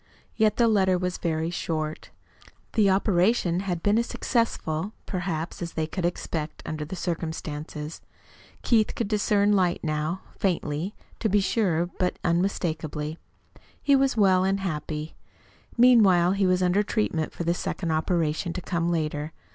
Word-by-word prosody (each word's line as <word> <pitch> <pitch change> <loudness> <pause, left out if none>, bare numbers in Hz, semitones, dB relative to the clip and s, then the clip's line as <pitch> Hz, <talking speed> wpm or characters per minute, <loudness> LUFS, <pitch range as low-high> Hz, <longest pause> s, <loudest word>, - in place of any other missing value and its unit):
Yet 215 -2 +3
the 235 -1 +4
letter 190 -4 +3
was 180 0 -2
very 160 0 -1
short. 155 -2 -3 0.6
The 210 -3 +4
operation 190 -1 +2
had 180 -3 -3
been 205 +2 +3
as 235 - -1
successful, 210 -6 -1
perhaps, 175 -2 -3
as 170 -1 -4
they 160 - -1
could 170 +2 -3
expect, 160 -3 -3
under 155 -1 -4
the 155 +5 -6
circumstances. 160 -3 -4 0.6
Keith 220 -3 +2
could 230 - -1
discern 205 -1 +2
light 180 -3 +1
now 155 +3 -1 0.2
faintly, 175 0 -1 0.2
to 220 - 0
be 205 +1 +4
sure, 190 -5 +1
but 180 -1 0
unmistakably. 160 -3 -1 0.6
He 280 - +4
was 270 -2 +2
well 190 -3 +4
and 195 +1 +1
happy. 155 -3 -4 0.6
Meanwhile 205 -8 +6
he 195 0 +2
was 185 0 +2
under 180 +3 +3
treatment 205 -7 -1
for - - -5
the 170 +1 +2
second 175 -1 -3
operation 160 +1 0
to 185 - -4
come 170 -1 -1
later. 155 -2 -2
175 Hz, 145 wpm, -26 LUFS, 160-200 Hz, 0.6 s, Meanwhile